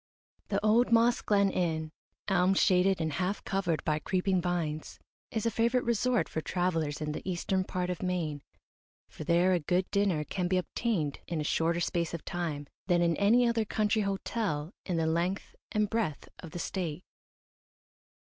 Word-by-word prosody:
The - - 0
old 235 +3 +4
Moss 235 +1 +4
Glen 200 -2 +3
Inn, 160 -4 -1 0.4
elm 190 -1 +3
shaded 190 -1 +3
and 160 -2 -1
half 185 +6 -1
covered 190 -5 -1
by 150 0 +1
creeping 185 +1 0
vines, 165 -4 -2 0.3
is 220 -1 -2
a 230 - +2
favourite 235 +3 +1
resort 235 +1 +1
for 160 - -3
travellers 165 -4 -1
in 150 0 -2
the - - -4
eastern 185 +1 0
part 180 -1 -2
of 180 - -5
Maine, 170 -6 -2 0.7
for - - -8
there 175 +3 +3
a 180 - +2
good 180 +4 0
dinner 200 -7 +2
can 180 +3 -2
be 185 +1 +2
obtained 180 - -1
in 170 -2 -2
a - - -1
shorter 165 +3 +1
space 170 0 -1
of 165 - -8
time 165 -5 -3 0.2
than 175 -2 +3
in 170 -1 +2
any 235 +5 +4
other 230 -1 +2
country 215 0 +1
hotel 195 -4 -2
in 180 -3 0
the 165 - +1
length 170 +4 -1 0.2
and 210 0 +2
breadth 205 -9 -2
of 165 - -8
the 165 - -7
State. 175 -2 -3
180 Hz, 175 wpm, -30 LUFS, 165-200 Hz, 0.7 s, old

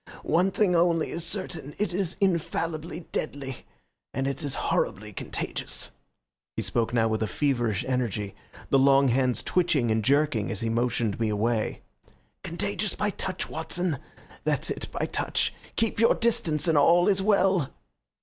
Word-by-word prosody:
One 175 +4 +3
thing 190 -2 +2
only 170 -1 +2
is 165 - -2
certain. 170 -5 -4
It 210 -3 -1
is 185 -2 -1
infallibly 170 -3 -1
deadly, 140 -4 -3 0.6
and 135 - 0
it 140 +4 -2
is 145 -3 -1
horribly 105 +2 -1
contagious." - - -2 0.6
He - - -2
spoke 115 -2 0
now 115 -2 +3
with 110 0 -1
a 110 - +1
feverish 120 -3 0
energy, 110 -6 -1 0.4
the 135 - +5
long 135 0 +5
hands 125 0 +1
twitching 155 -10 +2
and 110 0 +1
jerking 140 -4 +2
as 105 - -3
he 115 - -1
motioned 115 -2 0
me 115 -2 +1
away. 110 +1 -1 0.6
"Contagious - - -1
by - - 0
touch, - - -2
Watson 175 -5 -1 0.4
that's - - 0
it, - - -4
by - - -1
touch. - - 0 0.2
Keep 225 -2 0
your 230 - +5
distance 225 -10 +1
and 160 -3 +4
all 170 +4 +5
is 195 -2 +3
well." 190 -6 +3
140 Hz, 155 wpm, -27 LUFS, 120-175 Hz, 0.6 s, the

